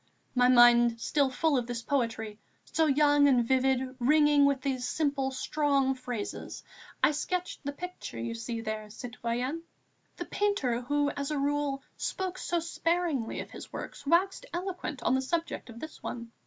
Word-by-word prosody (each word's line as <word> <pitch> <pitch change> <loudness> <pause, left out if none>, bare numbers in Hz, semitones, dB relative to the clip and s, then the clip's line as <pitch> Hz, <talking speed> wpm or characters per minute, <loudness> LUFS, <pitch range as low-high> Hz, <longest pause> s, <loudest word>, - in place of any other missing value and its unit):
My 250 -1 +4
mind 240 -1 +6
still 280 +3 +1
full 295 +4 +1
of 240 - -5
this 240 -1 -4
poetry, 225 -6 -1 0.3
so 320 -1 +1
young 290 0 +5
and 245 -4 +3
vivid, 260 0 +1
ringing 295 +2 +5
with 280 -2 +2
these 255 -2 -1
simple, 285 -3 0
strong 275 0 +1
phrases, 250 -5 -6 0.4
I - - +6
sketched 360 +5 -3
the 285 - -2
picture 360 - -7
you 115 0 -3
see 225 - -4
there, 215 -1 -4
citoyenne." 245 +6 -3 0.6
The - - -4
painter, 290 -13 0
who, 290 +3 +1
as 280 0 -4
a 300 - -1
rule, 285 -1 0
spoke 370 -1 -3
so 345 - 0
sparingly 335 -6 -1
of - - -10
his - - -10
works, - - -7
waxed 380 - +2
eloquent 350 -7 -4
on - - +2
the 260 - +2
subject 330 -1 -3
of 230 0 -10
this 315 +3 -9
one. 235 -1 -6
275 Hz, 165 wpm, -29 LUFS, 240-305 Hz, 0.6 s, mind